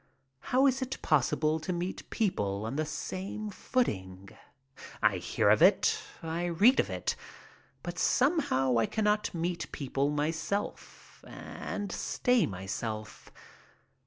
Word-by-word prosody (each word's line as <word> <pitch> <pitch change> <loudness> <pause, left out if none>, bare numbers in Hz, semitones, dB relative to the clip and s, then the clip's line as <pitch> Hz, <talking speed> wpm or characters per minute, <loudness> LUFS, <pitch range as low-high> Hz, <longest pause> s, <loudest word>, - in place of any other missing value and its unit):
How 260 - +2
is 265 0 +3
it 260 +1 -3
possible 155 +2 +2
to 155 +3 -4
meet 175 +1 -4
people 105 - -1
on 115 +4 -3
the 155 +1 -1
same 195 +6 -5
footing? 95 - -2 0.7
I - - +3
hear - - +2
of - - +4
it, - - +5 0.2
I 165 +2 -2
read 200 +10 +5
of - - +2
it, - - -2 0.7
but - - -5
somehow 190 - +2
I 115 - +2
cannot 210 -1 +1
meet 170 0 -3
people 140 -1 -1
myself 160 +7 -3
and 205 -2 -6
stay 250 +4 +1
myself. 105 +3 -5
165 Hz, 125 wpm, -30 LUFS, 130-210 Hz, 0.7 s, it